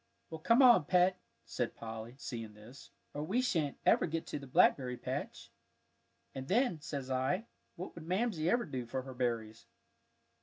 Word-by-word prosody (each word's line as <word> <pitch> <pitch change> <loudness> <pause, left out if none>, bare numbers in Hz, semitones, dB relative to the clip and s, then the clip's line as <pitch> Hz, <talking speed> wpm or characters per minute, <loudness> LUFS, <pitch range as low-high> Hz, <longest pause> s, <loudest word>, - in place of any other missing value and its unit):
"Well, 160 - -6
come 230 - +5
on, 240 - +7
Pet," 180 +2 +3 0.3
said - - -3
Polly, 115 +1 -7
seeing 115 -6 -6
this, 115 +6 -14 0.2
"or 145 - -4
we 195 +10 0
shan't 165 - 0
ever - - +4
get 165 0 -3
to - - -5
the 140 - -10
blackberry 125 -1 +3
patch; - - -5 0.8
and 135 0 -6
then, 210 - +1
says 140 -3 -5
I, 130 - 0 0.3
what 180 - -7
would 165 -1 -10
Mamsie 185 -4 0
ever 240 +3 +2
do 130 -5 -5
for 130 +2 -3
her 130 0 -8
berries!" 115 -3 -3
145 Hz, 165 wpm, -33 LUFS, 125-180 Hz, 0.8 s, on